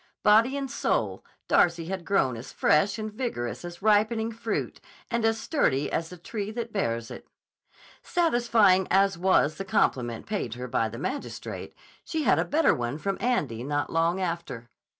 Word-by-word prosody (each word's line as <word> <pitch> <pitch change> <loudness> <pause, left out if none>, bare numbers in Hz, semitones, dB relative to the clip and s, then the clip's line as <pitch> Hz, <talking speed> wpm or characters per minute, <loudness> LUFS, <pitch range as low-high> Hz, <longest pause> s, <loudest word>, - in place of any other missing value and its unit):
Body 230 +6 +5
and 275 -2 -4
soul, - - -1 0.2
Darcy 170 -1 +3
had 185 0 -5
grown 135 -11 +2
as 115 +2 -9
fresh 195 +7 +2
and 215 -1 -5
vigorous 120 - -4
as 175 +2 -9
ripening 220 +2 +3
fruit 225 0 -4 0.3
and 235 -1 0
as 225 0 +2
sturdy 145 - 0
as 165 0 -2
the 180 - -10
tree 205 +4 -5
that 230 0 -5
bears 115 - -2
it. - - -10 0.7
Satisfying 235 - +3
as 195 0 +3
was 170 -4 +2
the - - -2
compliment 120 -11 0
paid 195 - -3
her 125 +1 -6
by 115 -2 0
the 115 - -8
magistrate, 265 - -5 0.3
she 320 -2 -2
had - - +4
a - - +1
better 315 +2 +3
one 120 +3 -3
from 195 +5 -2
Andy 145 - 0
not 145 +2 -2
long 165 +3 +1
after. 170 -10 -4
190 Hz, 170 wpm, -27 LUFS, 145-225 Hz, 0.7 s, Body